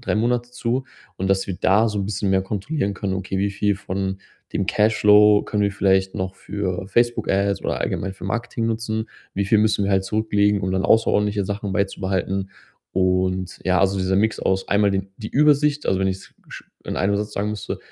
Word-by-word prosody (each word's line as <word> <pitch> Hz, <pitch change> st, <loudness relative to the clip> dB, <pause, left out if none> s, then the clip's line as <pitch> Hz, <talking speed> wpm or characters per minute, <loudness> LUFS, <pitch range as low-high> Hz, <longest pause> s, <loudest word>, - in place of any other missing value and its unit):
3 -, -, -1 dB
Monate 120 Hz, +2 st, 0 dB
zu. 125 Hz, +1 st, -2 dB, 0.3 s
Und 95 Hz, +1 st, -2 dB
dass 95 Hz, 0 st, +1 dB
wir 95 Hz, -, -2 dB
da 105 Hz, +5 st, +4 dB
so 105 Hz, -1 st, -3 dB
'n -, -, -2 dB
bisschen 100 Hz, -1 st, -1 dB
mehr 95 Hz, 0 st, +2 dB
kontrollieren 100 Hz, +3 st, -2 dB
können, 95 Hz, 0 st, -3 dB
okay, 95 Hz, 0 st, -4 dB
wie 100 Hz, +1 st, +1 dB
viel 100 Hz, +1 st, 0 dB
von 95 Hz, 0 st, -3 dB, 0.3 s
dem 95 Hz, -, -1 dB
Cashflow 105 Hz, 0 st, +5 dB
können 105 Hz, -1 st, 0 dB
wir 100 Hz, -, 0 dB
vielleicht 95 Hz, -1 st, +2 dB
noch 95 Hz, 0 st, -3 dB
für 95 Hz, -2 st, -4 dB
Facebook-Ads 100 Hz, -3 st, +1 dB
oder -, -, -1 dB
allgemein 95 Hz, -, -2 dB
für 95 Hz, -, -11 dB
Marketing 115 Hz, +3 st, -2 dB
nutzen? 110 Hz, -1 st, -2 dB, 0.3 s
Wie 100 Hz, -, 0 dB
viel 110 Hz, +2 st, +4 dB
müssen 105 Hz, -2 st, +2 dB
wir 100 Hz, -, 0 dB
halt 95 Hz, 0 st, +2 dB
zurücklegen, 105 Hz, 0 st, +1 dB
um 95 Hz, -1 st, -2 dB
dann 95 Hz, 0 st, 0 dB
außerordentliche 105 Hz, -2 st, +2 dB
Sachen 100 Hz, 0 st, -4 dB
beizubehalten? 95 Hz, -1 st, -1 dB, 0.4 s
Und, 95 Hz, 0 st, 0 dB
ja, 90 Hz, -1 st, +2 dB
also 95 Hz, 0 st, +2 dB
dieser 95 Hz, 0 st, 0 dB
Mix 110 Hz, +1 st, +1 dB
aus 95 Hz, 0 st, 0 dB
einmal 100 Hz, 0 st, +3 dB
den 95 Hz, 0 st, -2 dB
die 110 Hz, -, -6 dB
Übersicht, 150 Hz, 0 st, +3 dB
also 95 Hz, -, +1 dB
wenn 95 Hz, -, +1 dB
ich's 95 Hz, 0 st, -6 dB
sch -, -, -10 dB, 0.2 s
in -, -, -4 dB
einem 100 Hz, +1 st, +1 dB
Satz 105 Hz, +1 st, -3 dB
sagen 105 Hz, +1 st, -1 dB
müsste, 105 Hz, -1 st, -5 dB
100 Hz, 200 wpm, -22 LUFS, 95-110 Hz, 0.4 s, Cashflow